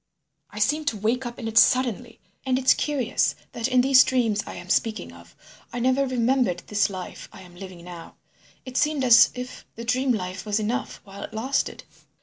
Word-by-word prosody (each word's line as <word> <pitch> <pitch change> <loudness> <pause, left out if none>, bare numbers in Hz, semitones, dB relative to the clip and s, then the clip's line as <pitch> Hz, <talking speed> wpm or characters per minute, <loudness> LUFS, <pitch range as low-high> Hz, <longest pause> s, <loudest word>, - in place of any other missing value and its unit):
I 205 - -13
seemed 295 +8 0
to 230 - 0
wake 235 +5 -1
up 240 - -8
in 230 - -5
it 225 0 +4
suddenly. 245 -2 +1 0.2
And 260 -1 +1
it's 260 0 +4
curious 265 -5 0 0.2
that 230 +1 -2
in 255 -1 +3
these 260 0 +6
dreams 230 -5 0
I - - -7
am - - -9
speaking 220 - -1
of 85 0 -16 0.4
I - - -6
never 260 +3 +1
remembered 245 -6 0
this 210 -1 +1
life 185 -2 -8
I - - -13
am 180 -1 -16
living 185 -2 -10
now. 175 -2 -11 0.5
It 255 0 -5
seemed 300 -2 +1
as 240 -2 +7
if 250 0 -7
the 230 - -7
dream 255 +2 +1
life 185 -3 -3
was 210 0 -1
enough 235 +5 -3
while 200 0 -11
it - - -8
lasted. 260 +5 -2
235 Hz, 195 wpm, -24 LUFS, 205-260 Hz, 0.5 s, as